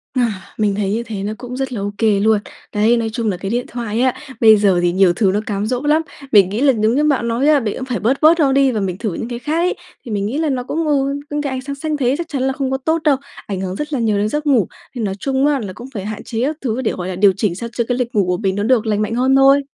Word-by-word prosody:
Ờ, 255 - +2 0.4
mình 210 -2 +1
thấy 200 -1 -1
như 230 +2 -1
thế 210 -4 -5
nó 210 +2 -2
cũng 250 0 -7
rất 265 -1 -3
là 215 - -3
ô 200 +1 -2
kê 215 -3 +2
luôn. 215 +1 +3 0.3
Đấy, 220 +3 +3
nói 225 -1 -1
chung 230 -2 -1
là 185 - -2
cái 195 +2 -4
điện 245 +1 -1
thoại 230 -1 -3
á, 255 -1 +3 0.3
bây 220 -2 +8
giờ 195 -3 +3
thì 175 0 +2
nhiều 185 -1 +4
thứ 195 0 +2
nó 205 - +1
cám 205 -1 -2
dỗ 245 +2 -1
lắm, 300 +2 +3 0.3
mình 195 -3 +6
nghĩ 215 +5 -2
là 275 -1 +5
giống 220 +1 +1
như 295 - +2
bạn 280 -6 +1
nói 235 +5 +1
á, 300 -1 +5
mình 220 -5 -3
cũng 260 - -5
phải 250 -3 -3
bớt 250 +6 0
bớt 325 +2 +6
nó 280 -4 +4
đi 270 0 +3
và 220 - -1
mình 185 -3 -2
thử 210 -3 -3
những 230 - -5
cái 240 -1 -5
khác 300 +6 -2
ấy. 355 +2 +1 0.3
Thì 235 - -7
mình 200 -1 -1
nghĩ 240 +8 -2
là 315 -2 0
nó 255 -2 -1
cũng, 315 +5 -2
ừ, 280 -1 +1
những 295 0 -2
cái 285 -2 -3
ánh 260 0 -3
sáng 280 +1 -5
xanh 305 +1 -3
thế 260 -1 +1
chắc 340 0 -4
chắn 275 -3 -2
là 265 0 +1
không 265 -1 -2
có 265 - +1
tốt 320 +4 -1
đâu, 290 -4 +3 0.3
ảnh 195 -2 -3
hưởng 185 -1 -3
rất 300 +6 -5
là 270 - 0
nhiều 220 -3 +1
đến 205 +1 0
giấc 300 +4 -2
ngủ. 245 - +3 0.3
Thì 240 - -3
nói 195 -3 -2
chung 270 +2 0
á 290 -2 +2
là 200 -6 -6
cũng 245 +7 -10
phải 200 -4 -5
hạn 215 0 -5
chế 230 -1 -4
các 295 +3 -1
thứ 245 -1 -2
để, 235 - 0
gọi 180 -1 -5
là, 185 - -4
điều 195 +1 +4
chỉnh 195 -4 0
sao 235 +5 -5
cho 240 0 -1
cái 245 - 0
lịch 245 -2 -3
ngủ 200 -3 +3
của 180 0 0
mình 195 -3 -1
nó 205 - -1
được 235 0 +2
lành 210 -1 0
mạnh 215 +2 -1
hơn 260 +2 +3
thôi. 275 +1 +6
235 Hz, 330 wpm, -18 LUFS, 210-270 Hz, 0.4 s, bây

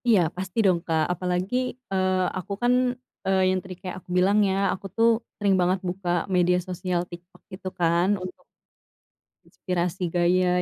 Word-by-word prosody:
Iya, 225 -5 +6 0.2
pasti 185 +1 -6
dong 180 -3 +4
Kak, 160 -1 +2
apalagi, 180 +4 -2 0.4
eee, 185 -1 +2 0.2
aku 195 +2 -6
kan, 240 +1 +3 0.5
eee, 190 0 +2
yang 185 0 +1
tadi 185 -1 -8
kayak 180 -2 -5
aku 180 - -26
bilang 195 +3 +4
ya, - - +1 0.2
aku 195 - -8
tuh 230 0 +5 0.3
sering 200 -2 +2
banget 180 +2 +2
buka 180 0 -4 0.3
media 180 0 +4
sosial 180 -1 -2
TikTok, 175 +1 -12
gitu 185 0 -7
kan. 170 +1 +3 0.2
Untuk 185 0 -9 1.0
inspirasi 180 -1 -2
gaya 180 +1 +3
185 Hz, 160 wpm, -25 LUFS, 180-190 Hz, 1.0 s, Iya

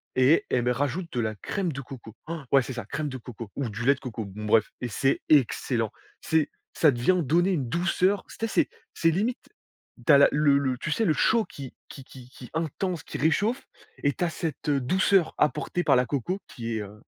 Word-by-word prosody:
et 130 +5 +5
elle 120 -2 +1
met 125 - +2
rajoute 145 +7 -2
de 120 - -1
la 110 -1 -1
crème 180 - -3
de 140 0 -5
coco. 120 -4 -11
Han! 160 -3 -6
Ouais, 135 -2 +5
c'est 130 - -6
ça, 120 - -5
crème 150 +5 -3
de 130 - -5
coco 115 -3 -9
ou 135 -5 -2
du 115 +4 -5
lait 140 - +6
de 135 - -12
coco, 115 -4 -5
bon 105 +2 -8
bref, 105 0 +3
et 125 - -2
c'est 135 +5 0
excellent! 140 -7 +2 0.3
C'est, 160 -2 +1 0.2
ça 155 - +4
d 120 -4 -1
vient 180 +9 +3
donner 175 +7 +2
une 135 -9 -1
douceur. 180 +5 +1
Tu - - -12
sais 225 - 0
c'est - - +1 0.3
c'est 165 - +3
limite 215 +9 0 0.7
tu 165 - +5
as - - +9
la 140 - +7
le 145 -2 +4
le, 130 -3 0
tu 150 - -4
sais 225 +7 +1
le 155 - +3
chaud 225 +9 +2
qui 135 -3 -9 0.2
qui 135 - -10
qui 130 -1 -13
qui 130 -2 -12
intense, 165 +1 -2
qui - - -6
réchauffe, 220 - +1 0.3
et 140 - +2
tu 180 - -3
as 170 - 0
cette, 160 -4 -5
heu, 140 -2 +2
douceur 185 +5 +2
apportée 150 +4 0
par 140 -5 +4
la 125 - +3
coco 145 - -2
qui 115 -2 -4
est, 110 - -2
heu 105 +2 -10
140 Hz, 235 wpm, -26 LUFS, 125-170 Hz, 0.7 s, as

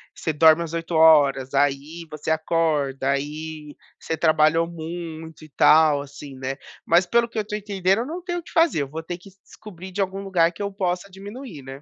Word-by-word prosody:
você 160 - -2
dorme 160 +2 +5
as 165 -1 -7
8 165 +1 -4
horas, 145 -5 +5
aí 145 +4 0
você 150 0 -6
acorda, 155 -4 0
aí 150 +2 -4 0.2
você 160 - -3
trabalhou 160 +1 +3
muito 165 -1 -8
e 155 - -13
tal, 150 0 +5
assim, 140 0 -10
né. 130 +1 -4 0.3
Mas, 175 +2 +4
pelo 235 +5 +2
que 235 - -10
eu - - +2
estou 210 0 -4
entendendo, 195 -1 0
eu 235 - -2
não 335 +6 -6
tenho 350 -1 -3
o - - -11
que - - -14
fazer, 325 - +3
eu - - -6
vou 155 +4 -6
ter 175 +1 -5
que 180 +3 -15
descobrir 190 -3 -12
de 195 - -7
algum 195 0 -2
lugar 175 -4 +2
que - - -10
eu 200 0 -2
possa 185 -1 -2
diminuir, 200 - -10
né. 135 +1 -10
165 Hz, 210 wpm, -23 LUFS, 150-190 Hz, 0.3 s, dorme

